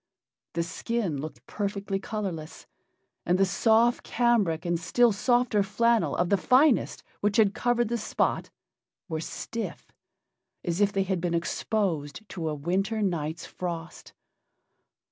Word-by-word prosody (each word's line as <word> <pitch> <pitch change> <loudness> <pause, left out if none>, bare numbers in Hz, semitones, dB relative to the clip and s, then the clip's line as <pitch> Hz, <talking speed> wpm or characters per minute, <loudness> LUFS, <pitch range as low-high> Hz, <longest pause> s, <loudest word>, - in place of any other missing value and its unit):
The 170 - 0
skin 180 -4 -2
looked 155 +1 -8
perfectly 200 -1 -3
colorless, 190 -7 -5 0.6
and 175 +2 +2
the 195 - +4
soft 225 +5 +3
cambric 210 -10 +1
and 170 -1 0
still 240 +6 +3
softer 240 0 +2
flannel 230 +3 +2
of 175 0 +1
the 200 - +4
finest 255 +6 +3 0.2
which 205 0 +1
had 210 -3 +5
covered 240 -1 +1
the 235 +1 -1
spot - - -1 0.6
were 160 -3 -3
stiff, 230 +7 -6 0.7
as 175 +3 -1
if 205 0 +4
they 195 -1 +1
had 190 -2 -1
been 170 -1 0
exposed 170 -1 -2
to 165 -3 -3
a 150 - -2
winter 195 +8 -1
night's 165 -3 -2
frost. 170 -2 -6
195 Hz, 135 wpm, -27 LUFS, 170-225 Hz, 0.7 s, had